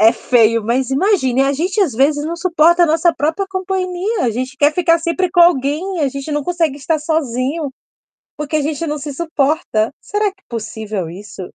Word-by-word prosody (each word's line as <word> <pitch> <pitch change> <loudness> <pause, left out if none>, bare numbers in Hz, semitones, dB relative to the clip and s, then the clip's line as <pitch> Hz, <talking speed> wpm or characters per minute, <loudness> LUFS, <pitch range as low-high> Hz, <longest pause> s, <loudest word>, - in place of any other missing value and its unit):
é 220 +1 +7
feio, 230 -2 +2
mas 250 +3 0
imagine, 270 - +2
a 275 - +1
gente 360 +8 -2
às 345 - 0
vezes 290 +5 +1
não 335 +2 -3
suporta 340 0 +3
nossa 330 +2 +3
própria 320 +6 -1
companhia. 375 +2 -2
A 235 - +2
gente 255 +4 -4
quer 290 +2 +3
ficar 335 0 +3
sempre 340 +2 -1
com 350 - +3
alguém. 340 +3 +2
A 285 - +2
gente 275 +3 -6
não 295 0 -1
consegue 330 -3 -1
estar 310 +3 0
sozinho, 295 -1 -2 0.7
porque 300 +1 -2
a 300 - 0
gente 300 +2 -2
não 300 -1 -3
se 290 0 -6
suporta. 290 -6 0
Será 415 +1 -2
que 390 - -33
é - - -63
possível 220 -5 -5
isso? 190 +1 -10
300 Hz, 190 wpm, -17 LUFS, 265-345 Hz, 0.7 s, é